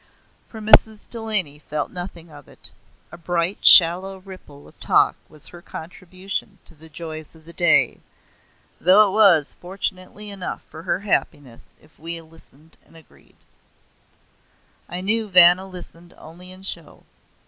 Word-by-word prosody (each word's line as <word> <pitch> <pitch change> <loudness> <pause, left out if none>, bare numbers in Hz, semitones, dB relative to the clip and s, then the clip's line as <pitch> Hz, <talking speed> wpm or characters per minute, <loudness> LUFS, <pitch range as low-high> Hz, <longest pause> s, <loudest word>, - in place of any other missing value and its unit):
For 220 - -11
Mrs. 215 0 +4
Delany 210 -11 -2
felt 150 0 -5
nothing 175 -2 -8
of 145 -2 -15
it. - - -1 0.4
A 170 - -12
bright 175 +2 -3
shallow 185 +2 +7
ripple 185 -7 -15
of - - -22
talk - - +2
was 155 -2 -12
her 175 - -14
contribution 185 +3 -8
to - - -16
the 160 +1 -15
joys 155 0 -9
of 160 -1 -20
the 170 - -14
day; 170 -1 +2 0.8
though 200 +4 +5
it - - -6
was, 190 -9 +4
fortunately, 190 +2 -7
enough 195 -2 -7
for 160 - -10
her 180 +3 -3
happiness 145 - -4
if 155 - -26
we 165 +1 -5
listened 160 -1 -20
and 165 - -21
agreed. 160 - -23 1.5
I 180 +1 -5
knew 215 +3 -1
Vanna 180 +1 +5
listened 175 -2 -13
only 175 +3 -12
in 185 +1 -12
show. 170 -4 -4
175 Hz, 145 wpm, -21 LUFS, 160-190 Hz, 1.5 s, shallow